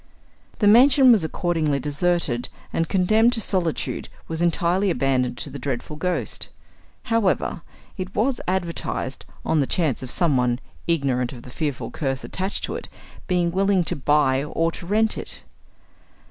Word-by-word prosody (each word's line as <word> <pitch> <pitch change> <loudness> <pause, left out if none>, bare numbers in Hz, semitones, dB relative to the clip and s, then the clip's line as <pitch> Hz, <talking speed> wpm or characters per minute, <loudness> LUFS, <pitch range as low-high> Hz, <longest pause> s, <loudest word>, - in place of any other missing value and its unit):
The 210 - +1
mansion 260 +4 +7
was 215 -7 +4
accordingly 160 -3 0
deserted, 145 -3 0 0.2
and 165 0 0
condemned 215 +6 +3
to 230 - 0
solitude, 180 -7 -1 0.2
was 165 0 -3
entirely 175 +3 +2
abandoned 130 -6 +1
to - - -5
the 140 - -7
dreadful 130 +2 -4
ghost. 160 - -2 0.5
However, 225 -4 0 0.4
it 185 0 -6
was 240 +4 +1
advertised, 170 -7 -2 0.2
on 160 - +2
the 140 - +1
chance 155 -8 0
of 130 - -5
someone, 125 -7 +2 0.3
ignorant 135 -7 0
of 120 -2 -10
the 125 - -11
fearful 145 -1 -3
curse 135 -4 -2
attached 190 +2 -3
to - - -2
it, - - -6 0.4
being 175 -2 +1
willing 195 0 +2
to - - -2
buy 140 -1 +2
or 165 +2 0
to 170 - -8
rent 220 +3 +2
it. - - -7
165 Hz, 150 wpm, -23 LUFS, 140-190 Hz, 0.5 s, mansion